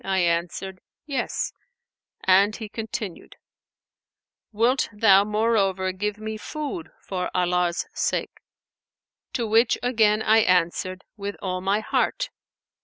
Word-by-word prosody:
I 195 0 0
answered, 175 +2 -1 0.2
'Yes,' 275 -5 -2 0.7
and 195 +3 +5
he 220 -3 -7
continued, 215 -4 -6 1.2
'Wilt 235 +5 +2
thou 205 -2 +5
moreover 205 -3 +1
give 210 +2 -3
me 215 0 -5
food 305 - -5
for 185 -2 -3
Allah's 180 -1 +1
sake?'; - - -2 0.9
to 235 - -1
which 225 +2 +3
again 220 -3 +3
I 220 +1 +5
answered, 185 -1 +1
'With 200 0 -4
all 185 -1 -3
my 200 +3 +1
heart.' - - 0
205 Hz, 110 wpm, -24 LUFS, 185-225 Hz, 1.2 s, and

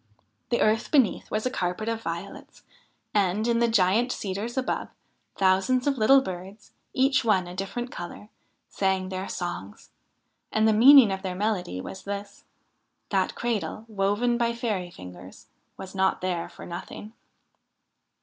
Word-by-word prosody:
The 240 - +1
earth 215 +1 +2
beneath 265 - +2
was 215 +2 -2
a 255 - 0
carpet 180 0 -2
of 230 0 -2
violets, 170 +1 -7 0.5
and, 205 +2 +1
in 235 -1 +2
the 235 - +3
giant 225 +3 +3
cedars 210 +5 -4
above, 260 - -1 0.5
thousands 195 +7 +2
of 275 -3 +1
little 270 +5 +6
birds, 190 0 -8 0.2
each 265 +1 +2
one 195 -5 +2
a 175 - -8
different 220 +7 -4
colour, 175 +4 -8 0.4
sang 190 -1 0
their 190 0 -4
songs; 175 - -6 0.6
and 220 0 +3
the 220 - +4
meaning 250 0 +8
of 190 0 -3
their 185 -2 -4
melody 190 - -1
was 190 - -7
this: 200 0 -6 0.7
that - - +1
cradle, 225 -2 -3
woven 215 +4 0
by 235 0 +1
fairy 210 -7 -2
fingers, 90 - -12 0.3
was 190 -1 -8
not 190 0 +1
there 180 -2 -2
for - - -11
nothing. 180 +5 -8
205 Hz, 150 wpm, -26 LUFS, 185-235 Hz, 0.7 s, meaning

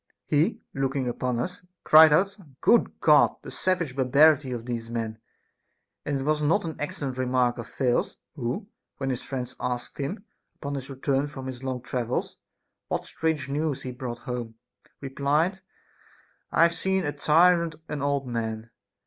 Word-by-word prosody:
He, 160 +9 +2
looking 135 -1 -1
up 120 - -3
upon 125 -1 -1
us, 180 +8 -4 0.2
cried 155 0 +8
out: 195 +6 +3 0.2
Good 235 -1 +3
God! 150 -2 +5
The - - -8
savage 175 -8 0
barbarity 140 +2 +4
of 120 -2 -4
these 115 -2 -4
men! 115 -2 -3 0.9
And 140 -2 0
was 155 0 +1
it 150 - +1
not 165 - +2
an 160 -2 -4
excellent 140 -3 -4
remark 125 -1 +1
of 120 - -6
Thales, 125 -2 0 0.2
who, 140 - -3 0.3
when 135 -1 -2
his 125 - -3
friends 130 -2 -5
asked 125 +2 -4
him, 190 +10 -4 0.3
upon 140 -1 -5
his 135 -1 -5
return 135 +1 0
from 135 -2 -8
his 130 -2 -6
long 130 -2 -4
travels, 125 -2 -3 0.5
what - - -2
strange 160 -4 -1
news 145 0 -2
he 130 - -4
brought 125 -2 -5
home, 120 -2 -5 0.5
replied, 145 +7 0 0.5
" - - -32
I - - +5
have 170 0 +4
seen 190 +2 0
a 145 - -1
tyrant 165 +3 +4
an 150 -2 -4
old 140 -1 0
man." 115 -2 -4
140 Hz, 165 wpm, -26 LUFS, 125-155 Hz, 0.9 s, cried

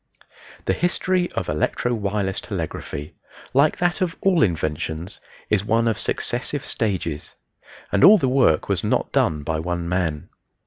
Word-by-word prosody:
The 95 - +2
history 180 - 0
of - - -2
Electro 75 +10 0
Wireless 100 -3 -1
Telegraphy, 75 +1 -5 0.4
like 140 +3 +4
that 175 +1 0
of 175 -3 0
all 190 -4 +3
inventions, 80 -1 -1 0.3
is 105 -2 +3
one 115 +2 +2
of 110 - 0
successive - - -2
stages, 90 -8 -3 0.6
and 100 - +2
all 215 +3 +10
the 135 - 0
work 125 - +3
was - - 0
not - - 0
done 75 -2 +1
by 80 +1 -1
one 85 +1 -3
man. 85 -4 -1
100 Hz, 145 wpm, -23 LUFS, 80-135 Hz, 0.6 s, all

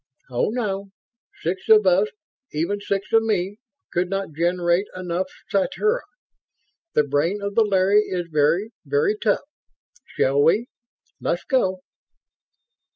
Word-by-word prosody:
"Oh, 120 - +1
no. 200 -4 -2 0.5
Six 185 +3 -3
of 215 -2 +7
us 185 +3 +4 0.4
even 170 +7 -1
six 200 +1 -3
of 225 - +6
me 205 -3 -1 0.4
could 175 +1 0
not 195 -4 -3
generate 175 +3 +1
enough... 185 0 -2 0.2
sathura. 425 - +1 0.9
The 150 - +5
brain 145 +8 0
of 200 0 -4
the 230 - +4
Larry 200 0 +4
is 180 -2 -2
very, 160 +8 +2
very 435 -1 +1
tough. 425 - 0 0.7
Shall 140 +2 +3
we... 210 +10 +4 0.5
let's - - -1
go?" 190 -10 0
195 Hz, 125 wpm, -23 LUFS, 175-210 Hz, 0.9 s, of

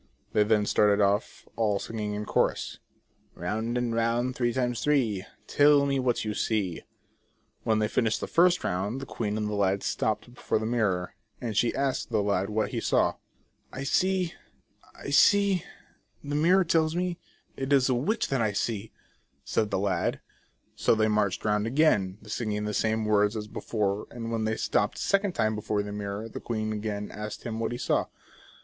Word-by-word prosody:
They 105 - +4
then 105 0 +3
started 105 0 +3
off, 100 +1 0
all 105 -3 +1
singing 105 0 -4
in 105 0 -4
chorus: - - 0 0.3
" - - -39
Round 110 +7 -2
and 120 -1 -1
round 115 +2 0
three 120 -1 +1
times 125 -1 -1
three, 115 -10 +1 0.2
Tell 145 -1 +5
me 140 -1 +1
what 125 -3 0
you 105 - -1
see" 100 -6 -1 0.8
When 110 -1 +1
they 110 0 +1
finished 110 -1 +1
the - - -3
first 180 +1 +3
round, 100 +8 -1
the 135 - -6
queen 105 -4 -3
and 105 -1 -1
lad 100 -1 +1
stopped 110 +2 -1
before - - -1
the 110 - -3
mirror, 105 -6 0 0.3
and 115 -3 -4
she 115 +3 +2
asked 135 -1 -1
the 110 -3 +1
lad 100 -1 0
what 110 +1 0
he - - -2
saw? - - +2 0.3
" - - -42
7 135 +2 -5
see, 185 +3 +1 0.6
I - - -7
see, 200 -4 +5 0.6
the 145 - -5
mirror 175 +6 +4
tells 160 -1 +2
me, 180 -1 -1 0.4
It 135 +1 -4
is 135 -2 +5
the 130 - +2
witch 185 - 0
that 135 -3 +1
I 110 -2 +1
see" 105 +1 -2 0.5
.said 110 - 0
the 100 - 0
lad. 95 -1 0 0.5
So - - +2
they 110 0 +2
marched 105 -2 0
round 105 0 +1
again, 115 -9 +2
singing 105 -1 -2
the 105 - -2
same 110 +1 0
words 105 0 +2
as 105 0 -5
before, 105 -1 -2
and 115 -1 -6
when 115 -1 -1
they 110 0 -1
stopped - - 0
a - - -5
second 200 -1 +1
time 110 -7 +1
before 105 -1 -1
the 105 - -6
mirror 100 +1 -4
the 115 - -7
queen 110 -2 -3
again 105 -1 -4
asked 105 0 -6
him 115 -1 -4
what 115 - -1
he 120 - -3
saw? - - +1
110 Hz, 190 wpm, -28 LUFS, 105-130 Hz, 0.8 s, Tell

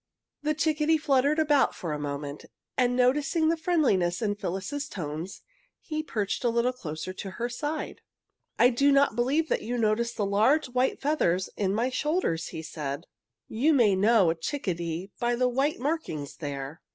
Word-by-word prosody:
The 305 +1 0
chickadee 310 +1 +2
fluttered 285 0 +2
about 295 -3 +3
for 165 -4 -4
a 150 - -3
moment, 145 0 -5 0.3
and 245 -1 +2
noticing 280 +5 +2
the 330 - +3
friendliness 270 - +1
in 210 -3 0
Phyllis's 205 +9 -4
tones 160 +1 -6 0.4
he 310 -1 -4
perched 215 -10 -2
a 240 - +3
little 235 +2 +1
closer 160 -6 -6
to 195 - -6
her 235 +5 -3
side. 295 +6 -4 0.6
"I 245 +2 +6
do 275 +4 +3
not 275 -4 +4
believe 275 +7 +1
you 245 +3 -3
noticed 230 +1 0
the 205 - +1
large 225 +9 +3
white 250 +1 0
feathers 190 - +1
in 195 -1 0
my 240 +4 0
shoulders," 300 - 0
he 160 - -7
said. 145 -3 -5 0.4
"You 280 +8 +2
may 240 -7 +5
always 190 - +1
know 210 -4 +5
a - - +1
chickadee 175 - -3
by 240 0 +1
the 250 +1 +2
white 270 +5 0
markings 250 - -3
there." 140 0 -6
240 Hz, 170 wpm, -27 LUFS, 185-285 Hz, 0.6 s, I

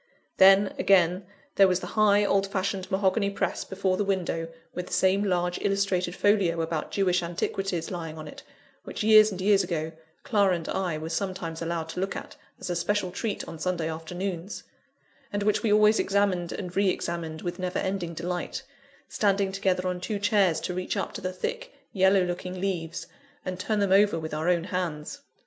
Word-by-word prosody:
Then, 195 +1 +6
again, 180 -1 +3 0.3
there 195 - +7
was 180 -1 +1
the - - -6
high, 210 -1 +4
old 195 -1 +2
fashioned, 195 -1 -2
mahogany 195 +1 +1
press 200 - -2
before 190 -1 -1
the 205 - +1
window, 180 -4 -1 0.3
with 180 - -5
the - - -8
same 190 +2 +3
large 180 -2 0
illustrated 195 -3 0
folio 195 -5 +2
about 160 -1 -2
Jewish 185 -2 +1
antiquities 175 +1 -3
lying 165 -3 -5
on 155 - -8
it, - - -10 0.4
which, - - -5
years 215 0 +7
and 190 - -6
years 200 0 +4
ago, 160 -3 -3 0.3
Clara 205 -8 +3
and 165 -2 -6
I 180 -4 -1
were 160 +1 -5
sometimes 170 -2 -3
allowed 165 -1 -2
to 165 - -5
look 195 +1 -2
at, - - -7 0.2
as - - -6
a - - -1
special 185 +2 0
treat, 215 +2 -3
on 165 - -8
Sunday 175 -3 -1
afternoons; 175 +3 -5 0.7
and 205 -1 -1
which 210 0 +2
we 220 - +1
always 215 +1 +5
examined 195 -3 +1
and 180 -2 -6
re 195 -1 +3
examined 165 -3 -3
with 175 +1 -4
never 185 0 -2
ending 185 -3 -2
delight 175 +2 -4 0.4
standing 200 -2 +1
together 190 -1 0
on 180 -1 -3
two 210 +2 -2
chairs 200 -5 +2
to 180 - -3
reach 185 +1 -3
up - - -3
to - - -6
the 185 - -2
thick, 485 - -5 0.2
yellow 190 0 +4
looking 180 +1 -4
leaves, 170 -3 -3 0.4
and 185 0 -4
turn 215 +3 -1
them 200 -2 +1
over 200 -2 +5
with 160 -1 -5
our 155 +3 0
own 175 -2 +2
hands. 170 -5 -4
185 Hz, 190 wpm, -27 LUFS, 175-200 Hz, 0.7 s, there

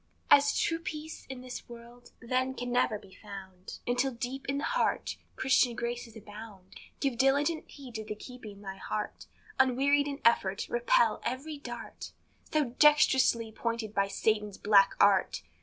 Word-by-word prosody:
As 285 0 +6
true 330 0 0
peace 315 -1 -7
in 260 -1 -7
this 255 -1 -8
world, 235 +1 -13
then, 255 +2 -1
can 245 0 -4
never 245 -3 +2
be 195 -2 -17
found, 190 -3 -10
Until 250 +2 +1
deep 255 +3 -5
in 275 - 0
the 285 - -3
heart - - 0 0.2
Christian 255 -2 +3
graces 235 -1 -4
abound, 210 -3 -12 0.2
Give 275 -4 0
diligent 285 +6 +1
heed 270 -4 -11
to 220 -1 -4
the 210 0 -5
keeping 215 -3 -11
thy 195 -1 -6
heart; 210 +2 -5 0.3
Unwearied 275 +3 +3
in 280 0 -4
effort, 200 -3 +3
repel 235 -1 +2
every 285 +4 -4
dart 285 - -8 0.4
So 305 -1 +3 0.2
dextrously 265 -6 +5
pointed 230 -1 -3
by 200 -1 +1
Satan's 210 0 0
black 200 -2 +5
art. 200 -2 +3
240 Hz, 155 wpm, -30 LUFS, 215-270 Hz, 0.4 s, As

